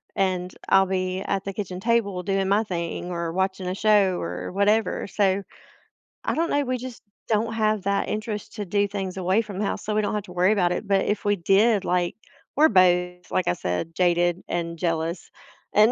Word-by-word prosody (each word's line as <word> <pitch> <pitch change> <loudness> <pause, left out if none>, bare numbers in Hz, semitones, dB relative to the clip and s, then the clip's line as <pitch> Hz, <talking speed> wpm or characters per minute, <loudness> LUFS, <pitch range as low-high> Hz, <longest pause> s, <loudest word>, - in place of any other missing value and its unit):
and 185 -2 0 0.2
I'll 195 0 +6
be 185 0 -2
at 195 -1 -2
the 195 - -4
kitchen 185 -3 -5
table 200 -3 +1
doing 195 0 0
my 205 +2 +3
thing 175 -3 -4
or 170 -1 -2
watching 190 +1 -1
a 180 - -1
show 205 -3 +3
or 90 +1 -5
whatever, 205 +2 +1
so 195 -1 +1 0.8
I - - 0
don't 335 +2 0
know, 285 0 +1
we 255 0 -1
just 250 -1 -8 0.3
don't 225 +1 +1
have 215 -2 +1
that 200 0 0
interest 215 -1 -4
to 210 - -4
do 200 +2 +1
things 195 -2 -4
away 190 +4 +2
from 205 -4 -7
the 210 - 0
house, - - -3
so 210 - -1
we 215 - +3
don't 210 - -1
have 210 - -2
to 180 - -11
worry 180 +2 +3
about 180 -4 +2
it, - - -4
but 195 -1 +2
if 205 0 -1
we 205 0 +3
did, 200 +3 +3
like 180 -1 0 0.4
We're 310 +2 +6
both, 180 -2 +2
like 185 - 0
I - - +3
said, 90 - -3
jaded 175 0 +2
and 170 -1 -3
jealous, 165 0 -2 0.4
and, 215 +3 +6
195 Hz, 205 wpm, -24 LUFS, 180-210 Hz, 0.8 s, I'll